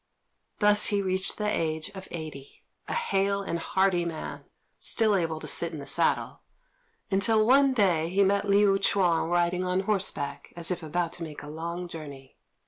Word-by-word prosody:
Thus 210 0 +5
he 205 - +1
reached 190 0 -2
the 210 - -1
age 160 -4 -1
of 190 -1 -10
eighty, 155 -5 -9 0.2
a - - -3
hale 200 - 0
and 170 -3 -3
hearty 190 0 +1
man, 165 -2 -6 0.3
still 220 -2 +1
able 165 -4 -1
to - - -9
sit 170 -1 +1
in - - -5
the 140 - -7
saddle; - - 0 0.7
until 215 +3 +3
one 270 +2 +4
day 175 -7 +2
he 195 +3 +3
met 200 +1 +1
Liu 200 -1 +4
Ch'üan 175 -4 +2
riding 175 +1 +1
on 185 +1 0
horseback, 195 -8 -2
as 170 0 +1
if 180 -1 -2
about 170 +2 -2
to 170 - -7
make 155 -3 -8
a - - -9
long 170 +3 -5
journey. 140 -5 -10
180 Hz, 175 wpm, -27 LUFS, 165-200 Hz, 0.7 s, Thus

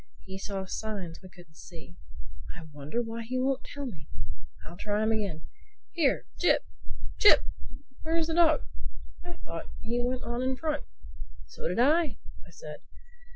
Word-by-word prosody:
He 190 0 -6
saw 195 -1 -2
signs 190 -4 -3
we 185 - -10
couldn't 175 -4 -16
see—I 160 - -11
wonder 150 +12 -1
why 230 0 -4
he 245 +3 -2
won't 265 +1 +2
tell 285 -1 -5
me. 170 - -7 0.6
I'll - - -8
try 205 +3 +1
him 220 - +3
again. 200 -8 0 0.5
Here, 310 -6 +3
Jip! - - +5 0.5
Jip!—Where 315 -5 +3
is 330 - +4
the 325 - -1
dog? 325 -2 +6 0.6
I 350 0 -6
thought - - -5
he 240 +1 +1
went 250 +1 0
on 240 +1 -1
in 260 +1 +2
front." 305 -1 0 0.6
"So - - -4
did 180 - -1
I," 300 +5 +5 0.3
I - - -15
said. - - -8
230 Hz, 155 wpm, -30 LUFS, 185-275 Hz, 0.6 s, dog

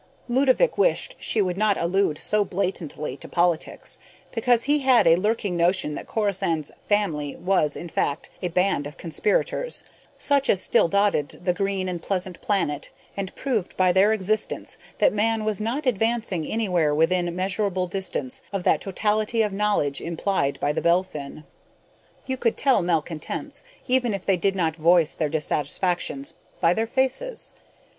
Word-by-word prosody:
Ludovick 265 - +2
wished - - +1
she 215 - +1
would 180 -1 -2
not 210 -1 +2
allude 170 -2 +1
so 210 0 +2
blatantly 180 -8 -3
to - - -10
politics, 170 -1 -1 0.3
because 235 0 +2
he 295 +2 +2
had 260 -6 +4
a 165 0 +7
lurking 205 0 -1
notion 170 -2 +1
that - - -7
Corisande's 190 -8 -1 0.2
"family" 165 -9 0
was, 180 -6 +1
in 175 - -6
fact, 145 -3 -2
a 180 - -1
band 180 -4 +1
of 150 +3 -12
conspirators... 480 - 0 0.3
such 280 -1 +2
as 190 - +4
still - - +3
dotted 200 -6 0
the 180 - +3
green 195 0 -1
and 175 -2 -4
pleasant 185 -1 -3
planet 150 -8 -1 0.3
and 195 -1 -5
proved 235 -9 -2
by 185 -1 +4
their 190 +4 +4
existence 215 0 0 0.2
that - - +3
Man 220 +1 +1
was 215 -2 -1
not 250 +7 -2
advancing 225 -7 0
anywhere 180 -9 +1
within 175 +2 +1
measurable 190 0 -1
distance 180 -8 -2
of 195 -2 -3
that - - +3
totality 215 +3 0
of 210 -2 -2
knowledge 200 -9 0
implied 170 -4 -1
by 145 - +1
the - - -2
Belphin. 170 -5 -1 0.8
You 260 0 -2
could 230 -2 0
tell 270 -7 +3
malcontents, 165 -2 -2 0.2
even 250 -4 +2
if 195 - -7
they 195 - +3
did 195 +2 0
not 165 -4 0
voice 170 0 +4
their 155 -2 -1
dissatisfactions, 150 0 -1 0.3
by 165 - +4
their 225 +4 -1
faces. 265 - 0
190 Hz, 155 wpm, -24 LUFS, 170-215 Hz, 0.8 s, a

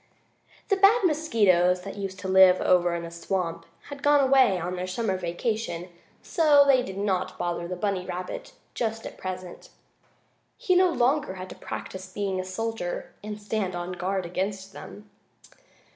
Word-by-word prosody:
The 395 - +3
bad 405 +4 +5
mosquitoes 205 - +3
that 195 - -7
used 195 -2 -5
to 190 - -5
live 190 -1 +6
over 175 -1 +3
in 170 - -4
the 170 - -7
swamp 170 0 -3 0.2
had 285 -1 -8
gone 290 0 +5
away 265 -7 +4
on 180 +2 -3
their 180 0 -4
summer 190 +1 -1
vacation, 180 +1 -3
and 180 - -14 0.3
so 300 -5 +5
they 270 -2 +5
did 190 -5 -7
not 195 -2 -1
bother 175 0 -2
the 180 - -4
bunny 190 0 -1
rabbit 180 - -6 0.2
just 225 -1 -3
at - - -7
present. 185 -1 -7 0.9
He 365 - +1
no 365 0 +5
longer 270 - +1
had 185 0 -8
to - - -9
practice 185 0 -7
being 195 -1 -2
a - - -2
soldier 185 0 -4
and 210 0 -6
stand 205 -3 -2
on 175 +1 -4
guard 185 +1 -2
against 195 +2 -4
them. 210 +1 -11
190 Hz, 170 wpm, -26 LUFS, 180-230 Hz, 0.9 s, live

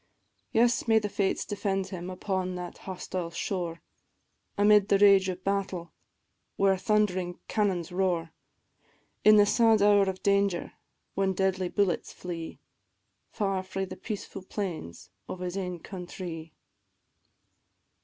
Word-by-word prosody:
Yes, 235 +2 +3
may 225 -1 +5
the 210 -1 0
fates 195 -1 0
defend 195 -2 -2
him 180 -2 -6
upon 185 0 -2
that 180 -1 -7
hostile 180 -1 -4
shore, 170 -1 -4 0.7
Amid 205 0 +5
the 200 - +5
rage 195 -1 +6
of 185 0 -5
battle, 190 -4 -2 0.6
where 195 -1 +3
thund'ring 185 -2 0
cannons 190 -6 0
roar; 175 -3 0 0.9
In 215 0 +8
the 205 -1 +7
sad 225 0 +4
hour 205 -1 +5
of 185 -1 -6
danger, 200 -3 +1 0.4
when 195 0 +1
deadly 190 -1 0
bullets 200 -4 0
flee, 170 -2 -7 0.7
Far 195 -3 -1
frae 190 +1 -4
the - - -8
peacefu' 205 -3 -6
plains 160 - -5 0.2
of 185 - -5
his 180 0 -3
ain 180 -2 -3
countrie. 175 -3 -7
190 Hz, 125 wpm, -28 LUFS, 180-200 Hz, 0.9 s, In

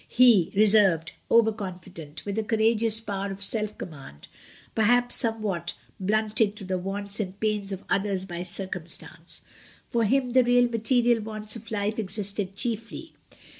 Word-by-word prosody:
He, 235 -8 +5
reserved, 200 -6 +4 0.2
over 230 -1 +5
confident, 180 -7 -8
with 205 +1 -2
a - - -1
courageous 220 0 +2
power 200 -3 -4
of 195 +1 -5
self 210 +1 -1
command, 135 - -10 0.5
perhaps 245 +3 +3
somewhat 215 - +1 0.2
blunted 215 +1 +1
to 210 - -4
the 185 -1 -2
wants 200 +2 -3
and 195 -1 -4
pains 210 -2 0
of 195 0 -5
others 195 -1 0
by 175 -2 -6
circumstance. 185 -2 -5 0.4
For 235 -1 0
him 255 +3 +1
the 255 -1 +6
real 245 0 +4
material 235 0 +2
wants 215 0 -1
of 230 0 -10
life 210 +1 -2
existed 200 -1 -2
chiefly. 230 +8 -4
210 Hz, 145 wpm, -26 LUFS, 195-225 Hz, 0.5 s, the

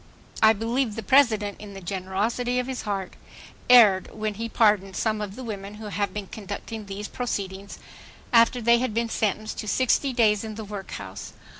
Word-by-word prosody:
"I 220 0 +7
believe 225 +1 -1
the 225 - -5
President, 215 -5 +3
in 205 -2 -10
the - - -7
generosity 200 +7 -2
of 250 - 0
his 260 0 -4
heart, 195 -2 -3 0.6
erred 215 -7 +7
when 215 -1 -3
he 230 +3 -5
pardoned 205 -4 +2
some 215 -1 0
of 205 -1 -5
the 260 - -8
women 205 -3 -6
who 215 0 -8
have 200 +1 -1
been 210 -1 -5
conducting 210 +2 -7
these 200 +1 -5
proceedings, 200 -5 -4 0.6
after 235 +1 +4
they 235 +1 +5
had 245 -4 -2
been 230 0 0
sentenced 215 0 -2
to 215 - -5
60 260 +4 +2
days 215 -4 +3
in 220 -1 -6
the 220 - -6
workhouse. 105 - -7
215 Hz, 180 wpm, -25 LUFS, 200-230 Hz, 0.6 s, I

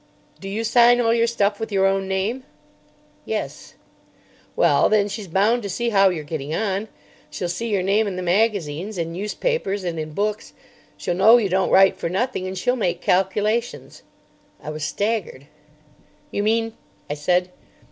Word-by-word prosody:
Do 195 - -7
you 215 +3 -3
sign 240 +1 +5
all 230 -1 +3
your 230 0 +2
stuff 205 -3 0
with 225 -1 -5
your 195 -1 +2
own 195 0 +1
name?" 195 +7 -2 0.8
"Yes." - - -5 0.8
"Well, - - +3
then, 210 -1 +3
she's 205 0 -6
bound 205 +8 +2
to 200 - -5
see 235 +5 -1
how 195 -3 +5
you're 165 -4 -4
getting 150 0 -4
on. 205 +1 -2 0.4
She'll 180 - -4
see 230 +7 -3
your 200 -4 0
name 205 +3 +2
in 195 - -4
the 185 - -4
magazines, 190 -1 0
in 165 -1 -3
newspapers 205 - -2
and 170 -2 -3
in 155 0 -5
books. 210 +4 -3 0.4
She'll - - -2
know 220 +6 +6
you 210 -5 0
don't 190 +1 +1
write 195 0 +5
for - - -3
nothing, 190 +1 -2
and 190 0 -5
she'll 245 +7 +1
make 180 -8 -1
calculations." 210 +5 -1 0.6
I 150 - -7
was 155 -1 -6
staggered. 200 -3 -2 0.9
"You 205 - -1
mean—?" 225 +1 0 0.3
I - - -3
said. 180 +5 0
200 Hz, 170 wpm, -22 LUFS, 180-225 Hz, 0.9 s, know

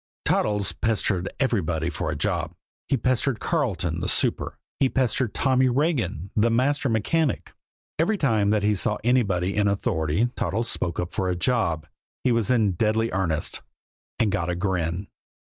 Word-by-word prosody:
Toddles 105 -2 +1
pestered 100 -4 0
everybody 85 - 0
for 80 -1 -3
a 75 - -2
job. 70 - -1 0.3
He 135 - +3
pestered 130 +1 +1
Carleton, 95 - -1
the - - -1
super. - - 0 0.2
He 135 - +3
pestered 130 -3 0
Tommy 130 -1 +3
Regan, 120 - 0
the 115 +2 +3
master 135 +4 +1
mechanic. 130 +7 0 0.5
Every 205 +7 +2
time 110 - +2
that 105 -1 +2
he 105 +1 +3
saw 105 +2 +1
anybody 100 -7 +2
in 105 -1 +2
authority 100 0 0
Toddles 115 +3 -1
spoke 85 -1 -2
up 90 0 -3
for 95 -3 0
a 90 - 0
job, 90 -5 0 0.4
he 125 - +3
was 115 -2 +1
in 115 -6 +3
deadly 110 +5 +1
earnest 85 -5 -1 0.6
and 110 -3 +2
got 90 -3 -1
a 90 - 0
grin. 90 -1 -1
105 Hz, 160 wpm, -25 LUFS, 90-125 Hz, 0.6 s, He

